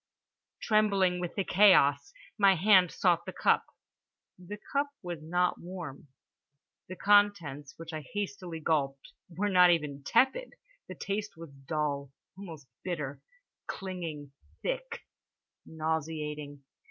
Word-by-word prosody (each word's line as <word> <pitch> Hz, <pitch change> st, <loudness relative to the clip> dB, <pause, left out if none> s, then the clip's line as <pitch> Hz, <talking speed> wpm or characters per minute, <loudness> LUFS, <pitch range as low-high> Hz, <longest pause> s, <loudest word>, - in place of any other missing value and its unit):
Trembling 200 Hz, -4 st, +2 dB
with 175 Hz, -1 st, -5 dB
this 195 Hz, -, -1 dB
chaos, 190 Hz, -, +5 dB, 0.2 s
my 200 Hz, -2 st, +5 dB
hand 185 Hz, 0 st, +5 dB
sought 170 Hz, -2 st, +1 dB
the -, -, -3 dB
cup. -, -, +2 dB, 0.7 s
The 185 Hz, +3 st, -8 dB, 0.2 s
cup 285 Hz, +1 st, +2 dB, 0.2 s
was 175 Hz, -2 st, -5 dB
not 175 Hz, +3 st, 0 dB
warm; 170 Hz, -6 st, -8 dB, 0.8 s
the 185 Hz, -, -6 dB
contents, 180 Hz, -9 st, +2 dB
which 165 Hz, 0 st, -9 dB
I 155 Hz, -, -4 dB
hastily 195 Hz, -5 st, -4 dB
gulped, 140 Hz, -4 st, -1 dB, 0.2 s
were 185 Hz, +4 st, -2 dB
not 180 Hz, -2 st, +6 dB
even 150 Hz, -5 st, 0 dB
tepid. 265 Hz, -, +2 dB, 0.3 s
The -, -, -8 dB
taste 205 Hz, -1 st, -4 dB
was 165 Hz, -3 st, -10 dB
dull, 140 Hz, 0 st, -3 dB, 0.3 s
almost 165 Hz, -7 st, -10 dB, 0.2 s
bitter, 150 Hz, -6 st, -4 dB, 0.5 s
clinging, 165 Hz, -7 st, -6 dB, 0.3 s
thick, -, -, -3 dB, 0.7 s
nauseating. 155 Hz, -2 st, -4 dB
175 Hz, 115 wpm, -30 LUFS, 150-200 Hz, 0.8 s, not